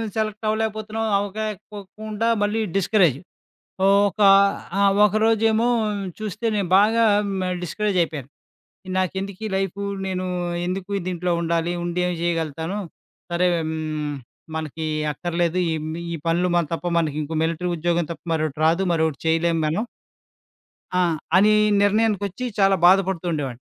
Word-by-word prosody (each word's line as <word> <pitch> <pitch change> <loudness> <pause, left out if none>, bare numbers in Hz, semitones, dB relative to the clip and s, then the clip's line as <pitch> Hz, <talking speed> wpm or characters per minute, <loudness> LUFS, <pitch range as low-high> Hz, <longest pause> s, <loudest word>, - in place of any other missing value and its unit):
Select 215 0 -2
అవ్వలేకపోతున్నాం, 220 0 -2
అవ్వకపోకుండా 210 +1 -4 0.2
మళ్ళీ 215 +2 0 0.2
discourage. 180 - +3 0.7
ఒక 200 +1 +3 0.6
ఆ - - +4 0.2
ఒకరోజేమో 220 +2 +2 0.5
చూస్తే 215 +2 -4
నేను 195 -4 -1
బాగా 225 +3 +4
ఆ - - +3 0.2
మ - - -1 0.2
డిస్కరేజ్ 205 +2 -2
అయిపోయాను. 145 -5 -5 0.7
నాకెందుకీ 190 +3 -3
లైఫు? 195 0 -2 0.2
నేను 185 -1 -2 0.4
ఎందుకు 185 +2 -4 0.2
దీంట్లో 180 0 -2
ఉండాలి? 170 0 0
ఉండి 175 +1 -2
ఏం 180 - -1
చేయగలుగుతాను? 165 +2 -2 0.5
సరే 180 +1 +2 0.2
హ్మ్. 155 -2 -3 0.4
మనకి 160 0 -4 0.3
అక్కర్లేదు. 175 +2 -1
ఈ - - 0 0.4
ఈ - - -2
పనులు 175 +2 +2
మన 170 - +3
తప్ప 165 +1 -3
మనకింకో 155 0 -2
మిలిటరీ 165 +2 -1
ఉద్యోగం 170 0 0
తప్ప 160 - -12
మరోటి 155 -2 -2
రాదు. 170 +4 +3
మరోటి 160 -3 0
చేయలేం 165 +1 +2
మనం. 170 +10 0 1.1
ఆ! - - +3 0.4
అనీ 210 +2 +5 0.3
నిర్ణయానికొచ్చి 205 +1 +1
చాలా 195 0 +5
బాధపడుతూ 190 -1 +3
ఉండేవాడిని. 135 -5 -4
185 Hz, 120 wpm, -23 LUFS, 165-210 Hz, 1.1 s, అనీ